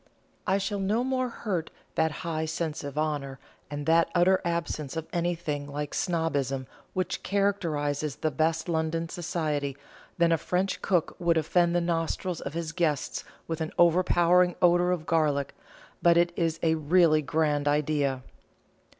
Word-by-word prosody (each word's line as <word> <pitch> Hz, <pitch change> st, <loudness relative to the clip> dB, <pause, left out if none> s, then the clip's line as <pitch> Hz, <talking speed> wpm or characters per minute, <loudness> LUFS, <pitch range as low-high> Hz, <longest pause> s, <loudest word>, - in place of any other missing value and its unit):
I 190 Hz, -, +3 dB
shall 200 Hz, +1 st, -2 dB
no 210 Hz, +5 st, +1 dB
more 255 Hz, -1 st, 0 dB
hurt 185 Hz, -8 st, -3 dB, 0.2 s
that 160 Hz, 0 st, +1 dB
high 160 Hz, -1 st, -1 dB
sense 160 Hz, -1 st, -3 dB
of 140 Hz, 0 st, -6 dB
honour, 145 Hz, -3 st, -2 dB, 0.3 s
and 145 Hz, 0 st, -5 dB
that 165 Hz, +1 st, +4 dB
utter 185 Hz, +2 st, +4 dB
absence 165 Hz, -4 st, -2 dB
of 160 Hz, -, -3 dB
anything 170 Hz, -4 st, -2 dB
like 145 Hz, 0 st, -4 dB
snobbism 145 Hz, -7 st, -1 dB, 0.3 s
which 185 Hz, 0 st, -1 dB
characterises 155 Hz, -8 st, 0 dB
the 155 Hz, -, -1 dB
best 160 Hz, +3 st, 0 dB
London 165 Hz, 0 st, -1 dB
Society, 150 Hz, -6 st, -2 dB, 0.4 s
than 170 Hz, -1 st, +3 dB
a 165 Hz, -, +3 dB
French 185 Hz, +4 st, -1 dB
cook 180 Hz, -4 st, +1 dB
would 170 Hz, -1 st, +2 dB
offend 170 Hz, +2 st, +2 dB
the 175 Hz, -, +3 dB
nostrils 170 Hz, +1 st, -2 dB
of 140 Hz, -, -6 dB
his 165 Hz, -2 st, -3 dB
guests 165 Hz, -5 st, -1 dB, 0.2 s
with 165 Hz, -1 st, -3 dB
an 160 Hz, -, -2 dB
overpowering 175 Hz, 0 st, +4 dB
odour 175 Hz, 0 st, +4 dB
of 175 Hz, -3 st, -1 dB
garlic; 150 Hz, -4 st, +1 dB, 0.5 s
but 170 Hz, -1 st, +5 dB
it 175 Hz, 0 st, +3 dB
is 165 Hz, -1 st, 0 dB
a 160 Hz, -1 st, +4 dB
really 160 Hz, 0 st, +4 dB
grand 150 Hz, -1 st, 0 dB
idea." 145 Hz, -3 st, +1 dB
165 Hz, 150 wpm, -28 LUFS, 150-175 Hz, 0.5 s, but